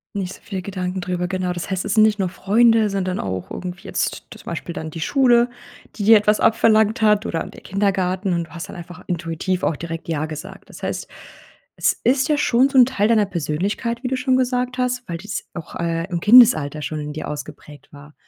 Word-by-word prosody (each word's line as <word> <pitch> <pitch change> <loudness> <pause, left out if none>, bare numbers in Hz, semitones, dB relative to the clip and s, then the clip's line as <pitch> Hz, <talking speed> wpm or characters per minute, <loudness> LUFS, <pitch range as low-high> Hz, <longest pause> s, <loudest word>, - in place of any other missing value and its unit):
Nicht 190 -2 -3
so - - -15
viele 195 -4 -5
Gedanken 185 -1 -4
drüber, 180 -1 -3
genau. 185 -1 -2
Das 175 +2 -6
heißt, 190 +1 -2
es 200 - -1
sind 215 - +5
nicht 215 -1 +3
nur 190 - +1
Freunde, 220 +3 +3
sondern 185 -2 -2
auch 95 -1 -4
irgendwie 180 0 -7
jetzt - - -2
zum - - -13
Beispiel 170 +1 -5
dann 160 -2 -5
die 165 - -8
Schule, 245 - +3 0.5
die 205 - -4
dir 220 +1 +8
etwas 210 +1 +2
abverlangt 220 -1 +3
hat, 210 -1 +3
oder 165 - -2
der - - -13
Kindergarten. 190 -1 0
Und 170 -1 -1
du - - -24
hast 170 -1 -7
dann - - -10
einfach 180 +1 -10
intuitiv 175 +2 -2
auch 155 - 0
direkt 165 0 -7
ja 155 -1 -1
gesagt. 155 +4 -9
Das - - -13
heißt, - - -3 0.7
es - - +2
ist 265 +4 +2
ja 300 -1 +2
schon 255 0 +3
so 270 - 0
'n 250 - +9
Teil 210 -4 0
deiner 220 -3 +3
Persönlichkeit, 195 - -3
wie 250 - -1
du 260 - -1
schon 255 0 +1
gesagt 250 0 0
hast, 250 0 -1
weil 170 -1 -4
das 205 +4 -5
auch, 165 -3 -8
äh, 165 -1 -1
im 170 -2 -2
Kindesalter 170 - +6
schon 155 +1 -4
in 150 0 -5
dir 155 - -5
ausgeprägt 145 0 -9
war. 145 +1 -14
185 Hz, 220 wpm, -21 LUFS, 170-225 Hz, 0.7 s, n